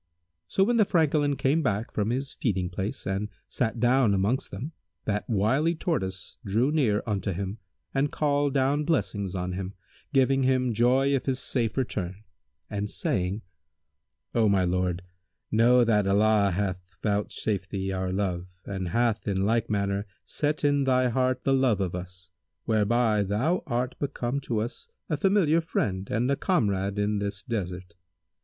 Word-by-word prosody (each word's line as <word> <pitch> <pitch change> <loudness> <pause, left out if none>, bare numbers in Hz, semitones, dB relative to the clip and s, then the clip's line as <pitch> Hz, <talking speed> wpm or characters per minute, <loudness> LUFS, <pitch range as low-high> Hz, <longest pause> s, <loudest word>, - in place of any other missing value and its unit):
So, 195 - +2
when 240 +4 +2
the 220 - +6
Francolin 150 -5 +2
came 145 +5 +2
back 110 -5 -1
from 105 0 -1
his 135 +3 -2
feeding 95 -6 -1
place 95 +3 -4
and 100 +2 -2 0.2
sat 115 -2 -2
down 120 -3 +4
amongst 105 +7 0
them, 145 +6 -6 0.3
that 105 -1 -2
wily 130 - +2
Tortoise 95 - -3
drew 115 +8 +1
near 120 -10 +2
unto 100 -2 -1
him 100 +4 -4 0.3
and 140 +1 +1
called 145 -1 +1
down 140 +2 +2
blessings 100 - -1
on 90 0 -2
him, 95 +1 -5 0.4
giving 135 -1 +3
him 130 -2 +2
joy 130 +5 +3
of 135 - -3
his 130 -1 +1
safe 115 -4 -1
return 105 -6 -3 0.4
and 105 0 -3
saying, 95 +2 -1 0.9
"O 110 -3 +3
my 95 -2 +3
lord, 90 0 0 0.5
know 120 +3 +5
that 105 -4 +2
Allah 105 0 +4
hath 95 0 -1 0.2
vouch 105 0 0
safed 100 -3 -2
thee 95 -1 -2
our 95 -1 -2
love 90 -2 -1 0.2
and 95 -2 -3
hath 115 +4 0
in 95 -1 +1
like 115 +1 +1
manner 100 0 -1 0.2
set 150 0 -1
in 145 -1 +3
thy 130 -1 +3
heart 130 +1 0
the 135 - +2
love 130 -6 +3
of 95 -3 -1
us, 90 0 -8 0.3
whereby 110 0 +2
thou 110 - +1
art 125 0 -1
become 140 -2 -2
to 115 -5 -2
us 120 - -5 0.2
a - - +3
familiar 190 -5 +3
friend 95 - -2
and 120 +5 +1
a - - +3
comrade 100 - 0
in 105 0 +1
this 100 -1 -3
desert. 90 -6 -4
110 Hz, 160 wpm, -27 LUFS, 100-135 Hz, 0.9 s, the